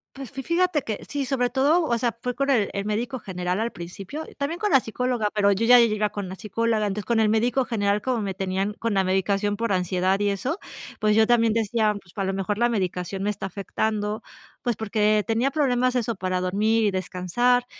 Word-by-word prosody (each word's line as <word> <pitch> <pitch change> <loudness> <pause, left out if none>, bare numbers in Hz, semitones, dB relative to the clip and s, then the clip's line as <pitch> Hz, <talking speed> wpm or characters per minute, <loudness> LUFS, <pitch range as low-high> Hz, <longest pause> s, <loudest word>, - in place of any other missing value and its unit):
Pues, 270 -3 -8
fi 270 +1 -6
fíjate 340 0 +1
que 215 -2 -4
sí. 285 -1 -2
Sobre 250 -1 0
todo, 285 +7 +3
o 235 -5 +1
sea, 235 -1 -1
fue 250 -1 -3
con 275 0 -1
el 225 -7 +3
el 200 0 -3
médico 235 +5 -2
general 180 -2 -3
al 230 +2 -1
principio, 195 - -7
también 285 +5 -2
con 420 -2 +1
la 270 - +7
psicóloga, 245 -1 -1
pero 200 -1 +4
yo 200 +3 +1
ya 245 +1 +8
iba 215 -2 +2
con 205 -2 -5
una 185 - -7
psicóloga. 215 +2 -1
Entonces 205 +1 -3
con 235 +1 +1
el 220 - +4
médico 235 +4 +2
general 205 -3 0
como 250 -1 -1
me 195 -2 -2
tenían 195 +2 -2
con 230 0 -2
la 195 -1 +3
medicación 195 +2 0
por 230 -2 0
ansiedad 185 +1 +1
y 205 - +2
eso, 250 - -2 0.4
pues, 215 0 +3
yo 220 0 +5
también 230 -2 +4
decía: 220 -1 +1
"Pues, 175 - -21
a 195 - -1
lo 190 0 -1
mejor 195 +2 -2
la 240 +2 +3
medicación 190 -3 -2
me 205 - 0
está 210 -1 -3
afectando", 210 +2 -2 0.4
pues, 240 -3 -1
porque 215 0 +2
tenía 235 +4 +1
problemas 255 -4 +1
eso 235 -2 0
para 185 -1 -1
dormir 215 +5 +1
y 205 - +2
descansar. 190 +7 +1
215 Hz, 220 wpm, -24 LUFS, 195-245 Hz, 0.4 s, ya